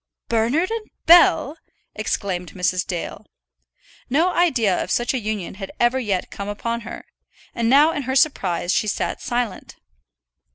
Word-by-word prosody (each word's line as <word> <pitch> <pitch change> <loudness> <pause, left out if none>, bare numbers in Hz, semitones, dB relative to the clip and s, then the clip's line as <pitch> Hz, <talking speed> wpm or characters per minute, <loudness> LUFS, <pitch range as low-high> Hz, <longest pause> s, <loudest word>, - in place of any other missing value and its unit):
"Bernard 240 - +1
and 450 -1 -4 0.2
Bell!" 330 -3 +5 0.3
exclaimed 180 -4 -3
Mrs. 180 0 -1
Dale. 175 -3 -5 0.9
No 320 +8 +3
idea 250 - +2
of - - -9
such 240 +2 0
a 260 - -1
union 215 -4 -4
had 195 - -6
ever 240 +2 +2
yet 200 -7 -2
come 200 - -6
upon 230 +3 -3
her, 235 +1 -9 0.5
and 230 -1 0
now 290 +5 +6
in 295 - -3
her 265 - 0
surprise 185 - +1
she 215 - +1
sat 205 - -2
silent. 240 -5 -3
235 Hz, 150 wpm, -22 LUFS, 200-275 Hz, 0.9 s, now